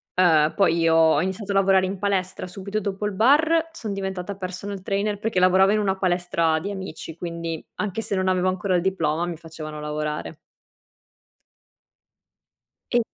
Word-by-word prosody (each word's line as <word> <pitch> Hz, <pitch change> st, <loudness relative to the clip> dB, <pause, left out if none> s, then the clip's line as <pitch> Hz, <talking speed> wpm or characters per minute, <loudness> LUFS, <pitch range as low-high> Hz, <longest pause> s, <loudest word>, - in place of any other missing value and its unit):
uhm, 160 Hz, -4 st, +4 dB
poi 175 Hz, -4 st, +3 dB
io 165 Hz, -1 st, +3 dB
ho 160 Hz, -1 st, +5 dB
iniziato 190 Hz, +2 st, -3 dB
a -, -, -1 dB
lavorare 190 Hz, -1 st, +4 dB
in 195 Hz, +1 st, -4 dB
palestra 190 Hz, -2 st, -1 dB
subito 195 Hz, +3 st, -4 dB
dopo 200 Hz, 0 st, -3 dB
il 205 Hz, -, -4 dB
bar, 315 Hz, +10 st, +3 dB
son 235 Hz, -10 st, -6 dB
diventata 190 Hz, 0 st, -4 dB
personal 190 Hz, +1 st, -6 dB
trainer 205 Hz, +2 st, -1 dB
perché 210 Hz, -2 st, -1 dB
lavoravo 185 Hz, +2 st, +5 dB
in 215 Hz, -, +2 dB
una 195 Hz, -2 st, 0 dB
palestra 175 Hz, -3 st, +1 dB
di 195 Hz, -, -5 dB
amici 190 Hz, -5 st, -7 dB
quindi 170 Hz, -2 st, -5 dB
anche 210 Hz, +1 st, -3 dB
se 200 Hz, -, -2 dB
non 185 Hz, 0 st, 0 dB
avevo 185 Hz, 0 st, +2 dB
ancora 185 Hz, 0 st, 0 dB
il 175 Hz, -, +2 dB
diploma 175 Hz, -3 st, 0 dB
mi 175 Hz, -1 st, -4 dB
facevano 155 Hz, -2 st, -8 dB
lavorare. 150 Hz, +1 st, -4 dB, 2.5 s
E 245 Hz, -, +4 dB
185 Hz, 165 wpm, -24 LUFS, 170-200 Hz, 2.5 s, ho